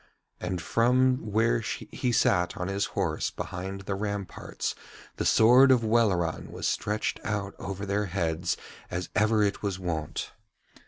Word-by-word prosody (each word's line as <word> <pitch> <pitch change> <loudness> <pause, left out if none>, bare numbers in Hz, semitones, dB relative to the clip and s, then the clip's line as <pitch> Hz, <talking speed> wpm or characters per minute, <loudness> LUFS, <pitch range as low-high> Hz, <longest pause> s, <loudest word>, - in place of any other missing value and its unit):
And 90 - -3
from 125 +2 +2
where 115 +3 +3
he 120 +2 -3
sat 90 -6 +2
on 90 +1 -3
his 100 +1 0
horse 80 -6 0
behind 95 +2 -5
the 100 +1 -3
ramparts 100 -1 -3 0.4
the - - -1
sword 125 +4 +7
of 125 -3 +5
Welleran 105 -8 +1
was - - -3
stretched 105 +1 -1
out 100 -1 -2
over 100 0 -5
their 100 +1 0
heads 85 -3 -1 0.3
as 90 0 -4
ever 110 0 +3
it 100 0 0
was 100 -3 -2
wont. 85 -5 -3
100 Hz, 145 wpm, -28 LUFS, 90-110 Hz, 0.4 s, sword